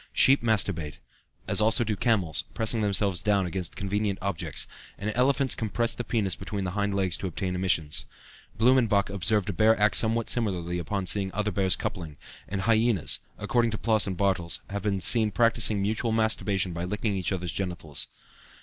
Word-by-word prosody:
Sheep 135 +1 +4
masturbate; 100 -9 -1 0.5
as - - +1
also 110 +3 +3
do 110 -2 -1
camels, 95 - 0
pressing 115 0 +3
themselves 100 -3 0
down 100 +1 +2
against 90 -1 -4
convenient 100 +1 -1
objects; 100 -4 -2 0.3
and 105 +2 -3
elephants 135 +1 +2
compress 115 +2 0
the 120 - -4
penis 105 -6 0
between 100 +1 -5
the 90 - -3
hind 100 0 -1
legs 95 -3 0
to 95 - -4
obtain 90 +1 -3
emissions. 90 -5 0 0.5
Blumenbach 115 -4 +3
observed 100 +1 0
a - - -7
bear 110 +4 +3
act 105 0 +3
somewhat 115 0 +2
similarly 90 -7 0
on 100 -3 -1
seeing 95 0 0
other 105 0 -1
bears 95 0 +2
coupling, 80 -8 -5 0.3
and 100 -1 -2
hyenas, 110 -3 +1 0.2
according 120 -1 +1
to 110 - -3
Ploss 110 -2 +2
and 95 -2 -3
Bartels, 95 -3 0
have 100 0 -3
been 100 -1 -1
seen 110 0 +5
practicing 110 0 +2
mutual 110 +3 -1
masturbation 105 -4 +1
by 85 +1 -4
licking 105 +3 -2
each 95 -1 -1
other's 90 -3 -2
genitals. 80 -7 -4
100 Hz, 175 wpm, -27 LUFS, 95-110 Hz, 0.5 s, seen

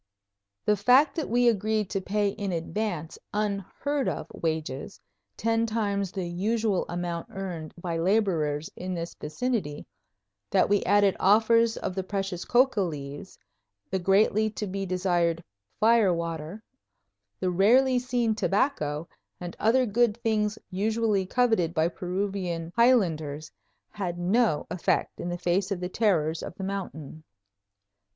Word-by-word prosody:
The 210 - +4
fact 250 +9 +4
that 320 - -3
we 245 +2 +3
agreed 215 -1 +1
to 195 - -1
pay 205 +2 0
in 200 -1 -4
advance 170 -1 -3 0.2
unheard 210 +7 -1
of - - -4
wages, 160 0 -3 0.4
ten 230 +1 +1
times 200 -4 -1
the 190 -3 -3
usual 205 +3 0
amount 175 -1 -3
earned 180 -5 -6
by 170 -1 -3
laborers 165 -6 +1
in 185 0 -4
this 170 0 -5
vicinity, 165 -3 -3 0.6
that 190 -2 +3
we 205 -1 +3
added 200 0 +4
offers 225 +3 +4
of - - -3
the 190 - -2
precious 195 -2 -3
coca 255 -3 +3
leaves, 145 -1 -5 0.5
the 190 - 0
greatly 205 +3 +3
to 215 0 -5
be 195 0 -4
desired 175 -2 0 0.4
"fire 220 -3 +5
water," 170 +3 -4 0.8
the 185 -1 0
rarely 250 +8 +4
seen 245 -2 0
tobacco, 190 - 0 0.3
and 175 -1 -6
other 250 +4 +3
good 230 0 +2
things 215 -1 +1
usually 210 0 0
coveted 225 -8 +1
by 160 0 +3
Peruvian 180 -2 -3
highlanders, 160 - +2 0.4
had 185 -5 -4
no 185 -1 +2
effect 180 - -1
in 175 - -3
the 175 - -3
face 180 +2 0
of 195 -3 -2
the 180 0 -3
terrors 165 -7 +1
of - - -7
the 190 - -7
mountain. 160 -6 -5
195 Hz, 135 wpm, -27 LUFS, 175-220 Hz, 0.8 s, fire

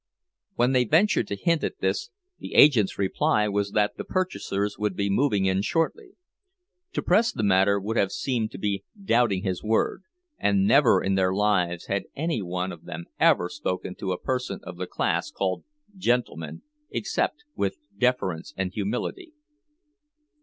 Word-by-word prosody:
When 125 +2 +3
they 125 -1 +3
ventured 160 - +3
to 100 - -3
hint 165 - +1
at - - -2
this, 430 +1 -1 0.3
the - - -8
agent's 125 -10 +6
reply 105 +2 +1
was 100 0 0
that 105 -1 +1
the - - -4
purchasers 105 - -2
would 105 -3 -1
be 100 0 0
moving 105 -3 +2
in 95 0 +2
shortly. 370 - -1 0.8
To - - -2
press 230 +2 +3
the 110 - -3
matter 100 0 +4
would 110 +4 -3
have 100 - +2
seemed 120 -5 -1
to - - -6
be 100 0 -2 0.2
doubting 115 - +2
his 95 -3 -2
word, 110 - 0 0.4
and 100 -1 +2
never 125 -5 +5
in 95 - +1
their 95 -1 +2
lives 90 -4 +1
had 100 0 -2
any 160 -5 -1
one 90 0 -3
of 85 - -11
them 85 - -7
ever 90 - +4
spoken 90 -8 -4
to 95 - -3
a 90 - -2
person 125 -6 -2
of 90 -1 -9
the 90 0 -4
class - - -1
called 95 -1 -2 0.3
"gentleman" 120 - -1 0.3
except 295 - -2
with - - -1 0.2
deference 125 -10 -1
and 95 -1 -2
humility. 125 - -3
105 Hz, 165 wpm, -26 LUFS, 95-130 Hz, 0.8 s, agent's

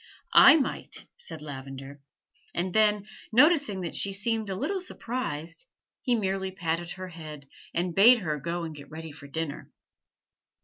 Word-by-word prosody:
"I - - +10
might," 280 - -3
said 160 - -7
Lavender; 135 0 -8 0.5
and 175 +1 -1
then, 210 -2 +3 0.3
noticing 285 - +4
that 170 - -4
she 200 - +1
seemed 220 +1 0
a 190 - -2
little 380 - -2
surprised, 170 - -5 0.4
he 250 -3 +2
merely 190 -3 -1
patted 175 -2 -3
her 185 0 -7
head 155 -4 -9 0.2
and 175 0 -1
bade 230 +7 +8
her 155 -8 -3
go 170 +4 -3
and 160 -1 -5
get 145 -2 -11
ready 160 0 -8
for 145 -1 -11
dinner. 155 0 -4
175 Hz, 150 wpm, -28 LUFS, 155-215 Hz, 0.5 s, I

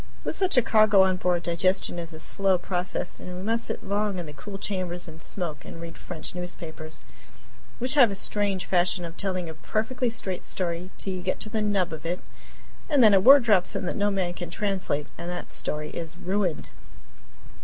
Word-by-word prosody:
With - - -2
such 370 -7 +1
a 250 - +6
cargo 215 -3 +6
on 190 -1 +2
board, 180 -1 +1
digestion 175 +1 +1
is 170 0 -5
a 160 - -8
slow 190 +3 +2
process, 180 0 -3
and 180 0 -7
we 185 - -6
must 230 +2 0
sit - - -4
long 205 0 -1
in 175 - -4
the 150 - -9
cool 195 +8 -8
chambers 185 -3 -3
and 160 0 -10
smoke 160 -7 -4
and - - -9
read 165 0 -8
French 170 -3 -5
newspapers, 165 -3 -8 0.7
which 250 +2 +2
have 265 -6 +7
a 200 - -4
strange 200 -1 0
fashion 180 0 +1
of 165 0 -8
telling 185 -3 -2
a 160 - -6
perfectly 225 +9 -1
straight 200 -5 -4
story 175 0 -3
till 195 - -3
you 185 - -4
get 185 +1 -1
to 215 - 0
the 220 0 -1
"nub" 195 -5 +1
of 155 - -7
it, 175 +2 -2 0.7
and 285 -5 +5
then 215 -2 +8
a 195 - +7
word 270 +7 +8
drops 205 -6 +3
in - - -2
that 180 - -2
no 205 0 +2
man 190 -3 -1
can 175 0 -6
translate, 190 -8 -1
and 170 +1 -5
that 175 0 -5
story 150 0 -3
is 165 0 -6
ruined. 185 -3 -1
185 Hz, 210 wpm, -26 LUFS, 170-205 Hz, 0.7 s, then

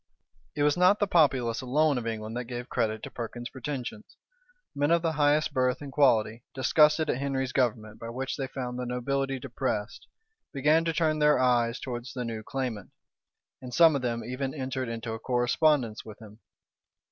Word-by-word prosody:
It 145 - 0
was 145 0 +3
not 180 +3 +5
the 205 - +1
populace 135 - +2
alone 140 +2 +2
of 115 - -6
England 110 0 -4
that 125 0 -3
gave 120 +1 -6
credit 110 -3 -1
to - - -7
Perkin's 120 +1 -6
pretensions. 140 - -6 0.6
Men 145 +1 0
of 170 0 +3
the 165 - +1
highest 150 0 +2
birth 130 0 +1
and 145 -2 -8
quality, 115 -5 +2
disgusted 150 +3 +4
at 130 - -1
Henry's 135 -2 -2
government, 110 -5 -1
by 115 - -7
which 130 +3 -4
they 135 -2 -3
found 125 -2 -5
the 125 - -3
nobility 135 +2 -1
depressed, 120 -5 -4 0.4
began 150 +4 +3
to 165 - +1
turn 155 -1 +1
their 150 0 +4
eyes 120 -1 +2
towards 125 -1 -6
the 125 -2 -4
new 115 -1 -4
claimant; 125 -4 -4 0.7
and 125 -2 -7
some 165 -3 +6
of 140 - -1
them 115 -2 -2
even 130 +3 -4
entered 130 -2 -3
into 115 0 -4
a 110 - -5
correspondence 125 0 +1
with 110 -2 -11
him. 110 -1 -14
130 Hz, 180 wpm, -28 LUFS, 120-145 Hz, 0.7 s, some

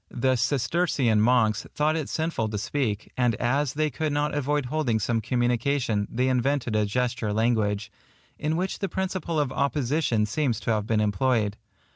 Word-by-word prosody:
The 130 +1 +1
Cistercian 130 -2 +1
monks 110 -2 +2
thought 155 +1 +2
it 155 -3 -3
sinful 160 -9 -1
to 105 - -3
speak, 110 -2 -2
and 120 -3 +2
as 135 +4 0
they 155 0 0
could 155 +3 -2
not 145 +1 0
avoid 145 0 0
holding 125 -4 0
some 115 +2 0
communication, 120 -2 0
they 125 +3 0
invented 130 -2 0
a 105 -1 +2
gesture 120 -1 -1
language, 105 -2 0 0.5
in 155 +2 0
which 185 +2 -2
the 195 - -2
principle 185 -3 -2
of 145 -3 0
opposition 140 -4 +1
seems 120 +1 -1
to - - -1
have 105 -1 0
been 110 -1 +2
employed. 105 0 +1
125 Hz, 165 wpm, -26 LUFS, 110-145 Hz, 0.5 s, monks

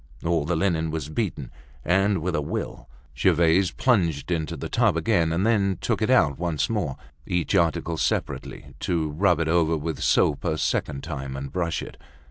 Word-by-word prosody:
All 85 -3 +1
the 85 +3 0
linen 80 -2 0
was 80 -2 -4
beaten, 75 - -3 0.3
and 95 0 +2
with 90 0 -1
a 75 - 0
will! 65 -3 -5 0.3
Gervaise 85 +1 +3
plunged 90 - +1
it - - +4
into 80 -1 -4
the - - -5
tub - - +2
again, 80 -2 +2
and 85 +5 0
then 100 -4 +2
took - - -1
it 110 - +1
out 80 - +3
once 85 +2 -1
more, 90 -12 -1 0.3
each 90 -2 -1
article 85 0 +1
separately, - - -3
to 80 -3 -1
rub 90 +3 +2
it 80 - 0
over 80 -1 +2
with 80 +1 -4
soap - - +2
a 80 - 0
second 70 -2 -1
time 70 -4 -5
and 70 0 -6
brush 85 -2 -2
it. - - -10
85 Hz, 185 wpm, -25 LUFS, 80-90 Hz, 0.3 s, it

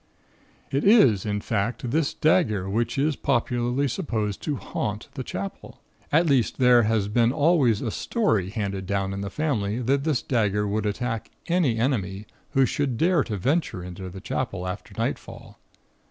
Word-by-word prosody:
"It 140 +2 0
is, 130 - +5
in 105 0 -1
fact, 115 +3 -2
this 155 0 +1
dagger 110 - +2
which 115 +6 -1
is 145 +2 +1
popularly 125 +1 0
supposed 110 - -2
to 150 - -2
'haunt' 105 -4 -4
the 130 - -5
Chapel. 100 -3 -7 0.3
At 165 +4 +4
least, 135 -7 +2
there 125 -2 +6
has 110 -2 +1
been 115 +3 +3
always 140 -7 +3
a 115 - -2
story 110 - 0
handed 100 -3 -3
down 95 -1 -1
in 100 - -4
the 100 - -4
family 115 -9 -1
that 135 +3 +1
this 150 -5 0
dagger 105 -4 +1
would 105 +1 -1
attack 115 +1 -3 0.2
any 165 -10 +1
enemy 105 -5 -1 0.3
who 135 -2 +4
should 135 -3 -1
dare 165 +1 +3
to 105 -4 -3
venture 125 - 0
into 90 +1 -7
the 95 +1 -9
Chapel, 100 -5 -3
after 90 +2 -7
nightfall. - - -5
115 Hz, 165 wpm, -25 LUFS, 100-140 Hz, 0.3 s, there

